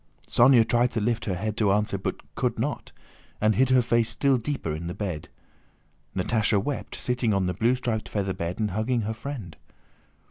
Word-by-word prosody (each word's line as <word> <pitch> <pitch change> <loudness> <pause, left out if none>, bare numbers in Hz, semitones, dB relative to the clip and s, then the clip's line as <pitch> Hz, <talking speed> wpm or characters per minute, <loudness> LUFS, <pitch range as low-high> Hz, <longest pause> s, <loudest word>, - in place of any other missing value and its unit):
Sónya 120 -2 +5
tried 120 +1 +3
to 115 - 0
lift 115 +2 0
her 95 - -1
head 105 +4 -3
to 105 -3 +3
answer 105 0 +1
but - - -5
could - - -1
not, - - -3 0.5
and 110 +1 +3
hid 130 +3 +3
her 130 -1 +5
face 115 -1 +2
still 135 +3 +2
deeper 115 - -3
in 80 +2 -5
the 90 - -5
bed. 90 -7 -4 0.9
Natásha 105 +2 +2
wept, 140 +7 -4
sitting 125 -4 0
on 95 -1 +1
the 90 - 0
blue 115 +7 +2
striped 115 -4 -3
feather 100 -2 -1
bed 85 +3 -4
and 105 -2 0
hugging 115 +4 0
her 110 +1 -2
friend. 110 - -7
110 Hz, 190 wpm, -26 LUFS, 100-120 Hz, 0.9 s, Sónya